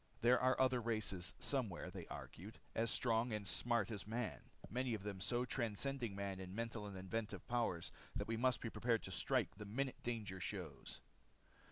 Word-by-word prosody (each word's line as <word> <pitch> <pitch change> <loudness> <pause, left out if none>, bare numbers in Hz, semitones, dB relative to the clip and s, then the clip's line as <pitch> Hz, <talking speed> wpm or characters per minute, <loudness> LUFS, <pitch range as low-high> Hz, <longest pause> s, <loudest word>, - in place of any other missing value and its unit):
There 125 +2 +7
are 130 0 +4
other 130 -2 +4
races 110 -6 +1
somewhere, 105 -10 0
they 90 -2 -6
argued. 105 +7 -7 0.2
As 115 +1 +2
strong 120 -2 +2
and 105 -2 -1
smart 120 0 +3
as 105 -2 -4
man, 115 +1 -1 0.3
many 125 +1 0
of 100 - -6
them 100 -2 -4
so 120 +5 +2
transcending 120 -1 0
man 100 -1 -2
in 95 0 -6
mental 115 -2 -2
and 100 -2 -6
inventive 105 +4 -3
power 120 -8 +2 0.4
that - - -1
we 115 - +1
must 125 +2 +3
be 115 - -2
prepared 115 -2 +2
to 95 - -5
strike 95 - +2
the 105 - -6
minute 130 +5 -1
danger 105 -6 -2
shows. 90 -7 -4
110 Hz, 180 wpm, -41 LUFS, 100-120 Hz, 0.4 s, There